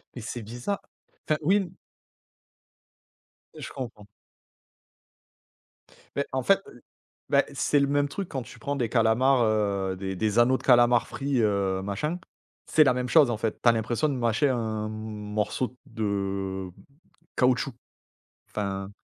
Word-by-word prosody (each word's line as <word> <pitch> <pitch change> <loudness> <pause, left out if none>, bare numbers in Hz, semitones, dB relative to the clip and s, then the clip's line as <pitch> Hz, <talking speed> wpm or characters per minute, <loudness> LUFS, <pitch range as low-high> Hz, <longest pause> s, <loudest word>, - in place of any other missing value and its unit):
Mais 120 - -6
c'est 115 +2 -5
biza 120 - -4 0.5
enfin 155 - +1
oui 190 +7 +4
n 185 -4 -2 1.8
Je - - -7
comprends. 115 -6 -7 2.1
Mais 140 - 0
en 130 -1 -1
fait, 195 +9 +4
heu, - - -12
l 120 - -17 0.5
bah, - - +5
c'est 145 - +2
le 140 - +2
même 145 0 +2
truc 195 +5 -5
quand 130 - -3
tu - - -13
prends 140 0 -2
des 120 -5 -1
calamars, 120 +3 +3
heu, 100 -3 +1
des 95 0 -4
des 110 +4 +1
anneaux 130 +2 +5
de - - -14
calamars 120 -2 +5
frits, 135 -2 -1
heu, 100 -3 +1
machin, 150 - -2 0.5
c'est 155 - +5
la 130 -4 +4
même 125 0 -2
chose 150 -6 +6
en 115 - -1
fait. 110 +1 -2
Tu 120 - +5
as - - +8
l'impression 115 +6 0
de 140 - -1
mâcher 120 +3 +2
un 110 -4 -1
m 110 - -5
morceau 110 +3 -3
de 95 -3 -3 0.7
caoutchouc, 125 0 +2 0.8
enfin 100 -1 -3
120 Hz, 155 wpm, -27 LUFS, 105-135 Hz, 2.1 s, as